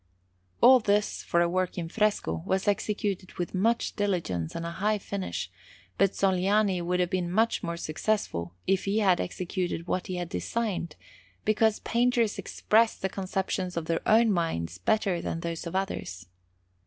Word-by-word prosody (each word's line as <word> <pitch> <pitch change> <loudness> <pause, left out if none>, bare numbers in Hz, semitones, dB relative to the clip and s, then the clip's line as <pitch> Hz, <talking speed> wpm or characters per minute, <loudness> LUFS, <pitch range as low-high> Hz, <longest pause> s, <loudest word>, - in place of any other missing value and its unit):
All 260 0 +8
this, 210 -1 +1
for 170 - +1
a 175 - +3
work 185 +1 -1
in 170 -2 -3
fresco, 185 - 0
was 190 +1 -1
executed 205 -2 -1
with 175 - -4
much 225 +5 +1
diligence 165 - -1
and 170 - -3
a 170 - -3
high 210 +5 0
finish; 185 - -4 0.5
but 195 0 +3
Sogliani 195 0 +2
would 180 +1 0
have 180 -1 +1
been 180 -2 0
much 225 +4 +2
more 170 0 -3
successful 155 - -2
if 195 -1 +1
he 200 +2 0
had 190 -5 +3
executed 180 -1 -3
what 185 0 -2
he 185 - -3
had 175 -1 -4
designed, 195 -10 -2 0.5
because 215 0 +2
painters 235 -2 +1
express 225 +1 +2
the 190 - -2
conceptions 190 -2 -2
of 165 - -2
their 165 0 -1
own 225 +1 +5
minds 90 - -1
better 190 - +1
than 165 - -3
those 170 0 -4
of 170 - -6
others. 100 - -3
185 Hz, 165 wpm, -28 LUFS, 170-210 Hz, 0.5 s, All